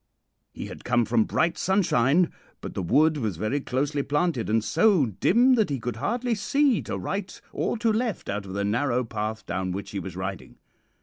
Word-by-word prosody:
"He - - -7
had - - -9
come 120 -1 +2
from 115 -1 +2
bright 165 +1 0
sunshine, 175 -4 +2 0.3
but - - -7
the - - -3
wood 150 - +3
was 110 - -2
very 110 - -1
closely 140 +3 -1
planted, 145 -4 0
and 110 0 +2
so 195 - +3
dim 235 - +3
that 220 -7 +2
he 140 -2 -2
could 115 -1 -4
hardly 235 - -1
see 270 +4 +2
to - - -4
right 195 -1 -4
or - - -1
to 225 -1 +1
left 230 -1 -2
out 100 0 -3
of 95 - -7
the 100 +1 -1
narrow 125 +4 +1
path 110 -1 -4
down 95 +1 -2
which 100 +1 -6
he 100 - -3
was 95 -2 -7
riding. 95 0 -6
135 Hz, 195 wpm, -26 LUFS, -, 0.3 s, wood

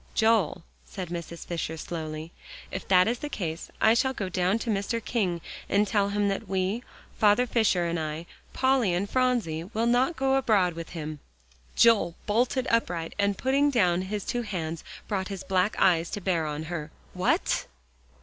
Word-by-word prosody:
"Joel," 220 -8 +2 0.2
said 185 -4 -7
Mrs. 170 -1 -6
Fisher 165 -2 -3
slowly, 160 -1 -5 0.4
"if 190 - -5
that 185 0 +5
is 240 +1 0
the 295 - -4
case, 165 - -4
I 220 - +5
shall 260 +3 +2
go 195 -4 -3
down 185 +3 +1
to 230 0 -2
Mr. 205 +3 -1
King 185 -8 0 0.3
and 205 +2 +3
tell 200 -1 +1
him 205 0 +1
that 200 +2 -2
we, 190 +4 -1 0.4
Father 215 +3 +5
Fisher 220 -7 +2
and 170 0 -1
I, 155 +1 -4 0.3
Polly 260 -8 +2
and 195 +3 -1
Phronsie, 235 -11 0
will 225 +4 -1
not 250 +7 +3
go 270 -1 +2
abroad 205 -9 +3
with 165 0 -7
him." 155 -1 -5 0.6
Joel 205 -8 +4
bolted 245 +4 +1
upright 175 -8 0
and, 200 -1 +2
putting 275 +2 +2
down 185 -9 +2
his 200 +2 -4
two 245 - -1
hands, 165 -7 -4 0.2
brought 190 -3 -1
his 195 -2 -6
black 190 +2 +1
eyes 170 -3 +3
to - - -4
bear 175 -5 0
on 150 +1 -3
her. 160 -2 -5 0.2
"What?" - - +1
195 Hz, 175 wpm, -27 LUFS, 170-230 Hz, 0.6 s, that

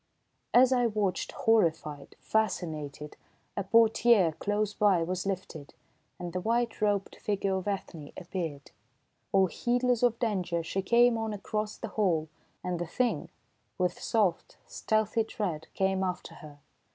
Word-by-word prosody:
As 255 +1 +6
I 245 -2 +3
watched, 205 -4 -1
horrified, 165 - +1
fascinated, 155 -9 -2 0.4
a - - -1
portière 225 -3 +4
close 210 0 0
by 195 -6 +3
was 185 +2 -3
lifted, 180 -6 -5 0.4
and 175 -1 -6
the 180 - -2
white 230 +2 0
robed 205 -2 0
figure 200 -2 -1
of 190 +1 -3
Ethne 175 -7 -4
appeared. 165 -6 -5 0.6
All 195 -1 +5
heedless 245 +6 0
of 240 -2 +3
danger 185 -8 -1
she 195 +4 -2
came 235 +3 +4
on 220 -1 -2
across 210 +1 -3
the - - -6
hall, 170 -7 0 0.3
and 180 -1 -2
the 175 - -3
Thing, 245 +8 -1 0.5
with 180 -2 -1
soft, 200 -7 0
stealthy 220 +1 0
tread, 180 -8 -4
came 190 0 +1
after 180 -1 -4
her. 150 -2 -12
195 Hz, 140 wpm, -29 LUFS, 175-220 Hz, 0.6 s, As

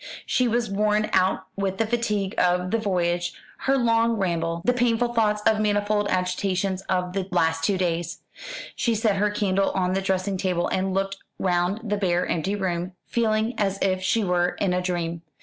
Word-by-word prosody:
She 255 - +2
was 235 0 +1
worn 210 +1 +1
out 185 0 +2
with 195 -1 -2
the 225 - +1
fatigue 210 -4 -1
of 180 0 +2
the 230 - +2
voyage, 175 -4 0 0.3
her 270 0 +4
long 230 -1 +3
ramble, 170 -4 -1
the 250 - +4
painful 240 -1 +1
thoughts 210 -2 +1
and 215 -1 +4
manifold 205 0 +1
agitations 185 +1 0
of 180 -1 0
the 190 -1 -2
last 165 -3 +1
two 195 +3 +2
days. 170 -2 -2 0.5
She 235 -2 +1
set 215 -2 +1
her 210 +1 +2
candle 195 -2 +1
on 185 -1 +1
the 195 - 0
dressing 190 0 -1
table, 180 -2 0
and 190 0 0
looked 195 0 -1 0.2
round 185 +5 0
the 205 - +2
bare 180 -3 +1
empty 185 +5 -1
room, 180 -2 -2
feeling 220 0 +1
as 195 -2 +1
if 185 -1 +1
she 215 +4 +1
were 180 -1 +1
in 190 -3 +1
a 180 - +1
dream. 170 -2 -2
195 Hz, 185 wpm, -25 LUFS, 180-215 Hz, 0.5 s, her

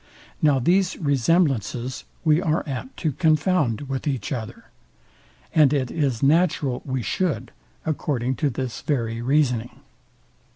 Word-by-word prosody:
Now 145 -3 +4
these 180 +8 +2
resemblances 135 - +1 0.2
we 155 +1 +4
are 160 -1 0
apt 130 -3 -6
to 155 - +1
confound 155 - +2
with 135 +1 -4
each 135 -1 -2
other; 115 -5 -5 0.9
and 150 -4 +5
it 130 -4 0
is 140 -7 -1
natural 150 -3 +2
we 130 -3 -2
shoud, 180 - -1 0.3
according 130 -5 -1
to 150 - +1
this 130 -1 -4
very 115 -5 -1
reasoning. 125 -3 0
140 Hz, 125 wpm, -23 LUFS, 125-155 Hz, 0.9 s, and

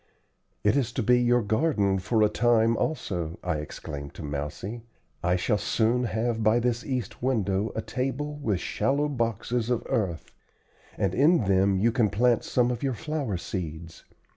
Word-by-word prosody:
"It 105 +4 +3
is 130 -4 +1
to 125 - -1
be 125 +3 +4
your 120 -1 +3
garden 105 -4 +1
for 110 +4 +1
a - - +6
time 115 +1 +3
also," 90 - -2
I 90 -3 -1
exclaimed 70 -1 -7
to - - -8
Mousie. 75 +10 -5 0.4
"I 90 +1 +2
shall 105 +3 +1
soon 115 +3 +1
have 115 0 -1
by 110 +2 +4
this 120 0 0
east 125 -6 -4
window 110 -5 0
a 110 - -2
table 135 +3 -3
with 110 -11 -1
shallow 145 +9 0
boxes 120 -2 -1
of 120 -2 0
earth, 90 -7 -2 0.7
and 95 -2 0
in 150 - +4
them 95 0 +3
you 115 +5 +3
can 115 -3 +2
plant 120 +3 +2
some 125 -1 +1
of 120 - -4
your 135 -3 -1
flower 150 - -3
seeds. 85 -2 -6
110 Hz, 165 wpm, -27 LUFS, 95-125 Hz, 0.7 s, a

